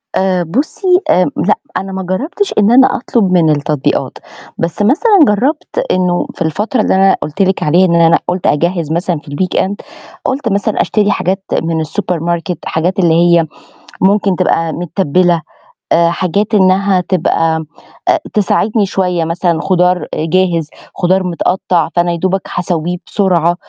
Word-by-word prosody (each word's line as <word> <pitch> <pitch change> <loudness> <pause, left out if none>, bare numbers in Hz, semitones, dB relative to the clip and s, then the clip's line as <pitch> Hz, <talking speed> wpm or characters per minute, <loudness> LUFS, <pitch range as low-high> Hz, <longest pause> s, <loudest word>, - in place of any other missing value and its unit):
آآ 185 -2 +1
بُصي 310 - 0
آمم 180 - +2
لأ، 210 - +2 0.2
أنا 195 +1 -5
ما 190 0 -4
جربتش 290 - -2
إن 210 +2 +4
أنا 260 +1 +5
أطلب 225 -6 0
من 170 -3 +3
التطبيقات، 150 -1 -1 0.4
بس 165 +4 -3
مثلًا 385 - +3
جربت 255 - -1
إنه 180 -1 0
في - - -16
الفترة 210 - -1
اللي - - +1
أنا 195 0 +4
قُلت 155 +6 -4
لِك 190 0 +1
عليها 175 +5 +3
إن 170 -1 +1
أنا 165 0 +4
قُلت 180 0 -1
أجهّز 170 +1 0
مثلًا 170 0 -1
في 145 -1 -14
الweekend 185 +4 -1 0.5
قُلت 265 -3 -1
مثلًا 200 +2 0
أشتري 210 -1 +1
حاجات 190 0 -1 0.2
من 165 -1 -1
السوبر 180 +2 -3
ماركت، 170 +1 -2
حاجات 180 +4 -1
اللي 170 -3 +3
هي 170 -1 +4 0.6
ممكن 195 -1 +2
تبقى 165 -3 0
متّبلة 175 0 0 0.5
آآ 170 0 +4
حاجات 190 +5 -1
إنها 190 -1 +3
تبقى 165 -3 0 0.4
آآ - - +3
تساعدني 210 +1 +1
شوية 180 -3 -1
مثلًا 165 0 -1
خضار 180 0 +1
جاهز، 165 -1 0 0.3
خضار 185 +1 +1
متقطع 180 -1 0
فأنا 175 0 +2
يا 170 - -2
دوبك 190 +2 -1
هاسويه 175 0 -2
بسرعة، 175 -4 +1
180 Hz, 150 wpm, -14 LUFS, 170-195 Hz, 0.6 s, أنا